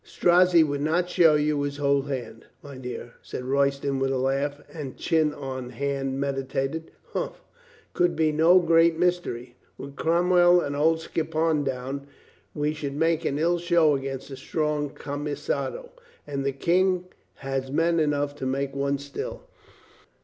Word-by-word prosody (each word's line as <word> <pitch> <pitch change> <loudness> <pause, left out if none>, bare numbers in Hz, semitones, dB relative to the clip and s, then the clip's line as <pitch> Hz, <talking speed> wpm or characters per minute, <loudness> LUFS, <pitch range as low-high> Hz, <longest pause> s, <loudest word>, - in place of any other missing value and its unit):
"Strozzi 175 -1 +4
would 145 -2 -2
not 175 +4 0
show 165 -3 +5
you 150 -1 +1
his 145 0 -3
whole 140 -1 +2
hand, 120 -5 -6 0.2
my 140 -1 -10
dear," 125 -2 -7
said 125 - -7
Royston 140 0 +1
with 135 0 +1
a 135 - 0
laugh, 135 +2 -1
and 145 -5 -7
chin 160 -2 +2
on 130 -4 -6
hand 135 +1 -2
meditated.... 135 +3 -2 0.2
"Humph, - - -2
it - - -29
can 175 0 +2
be 155 -1 +2
no 165 +4 +5
great 165 -1 +4
mystery. 165 -9 -1 0.2
With 140 0 -9
Cromwell 175 +2 +4
and 145 -4 -2
old 160 +2 +2
Skippon 160 -1 0
down, 135 +1 -4 0.5
we 150 +1 0
should 145 -2 -5
make 165 +1 +1
an 140 - 0
ill 170 +3 +1
show 170 -3 +3
against 135 0 -5
a 135 - -6
strong 150 -1 -1
camisado. 150 - -4 0.3
And 140 -2 -3
the 140 - 0
King 180 +6 +1 0.3
has 135 -1 -3
men 165 +3 +2
enough 145 -2 0
to 130 - -3
make 135 +1 -2
one 140 0 0
still. 140 0 -6
145 Hz, 155 wpm, -26 LUFS, 135-165 Hz, 0.5 s, show